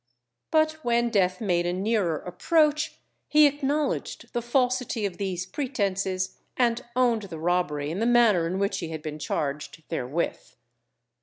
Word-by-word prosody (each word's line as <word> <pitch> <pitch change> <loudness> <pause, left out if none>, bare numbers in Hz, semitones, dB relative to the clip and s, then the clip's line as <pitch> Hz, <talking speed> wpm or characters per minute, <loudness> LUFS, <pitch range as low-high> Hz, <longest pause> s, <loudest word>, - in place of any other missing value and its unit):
But 315 0 +2
when 235 0 +2
death 185 -4 +2
made 175 -5 +1
a 175 - 0
nearer 190 -4 0
approach 305 - +1 0.3
he 305 0 +6
acknowledged 290 +1 -1
the 240 - 0
falsity 250 -2 0
of 190 -3 -3
these 185 -3 -2
pretences, 195 -6 -2 0.2
and 240 0 +2
owned 245 -3 +3
the 165 - -6
robbery 155 -3 0
in 175 - -3
the 230 - +1
manner 225 -8 +4
in 180 +3 -2
which 200 0 0
he 165 - -4
had 160 -1 -6
been 155 -1 -5
charged 150 +2 -3
therewith. 160 +1 -3
200 Hz, 150 wpm, -26 LUFS, 175-250 Hz, 0.3 s, he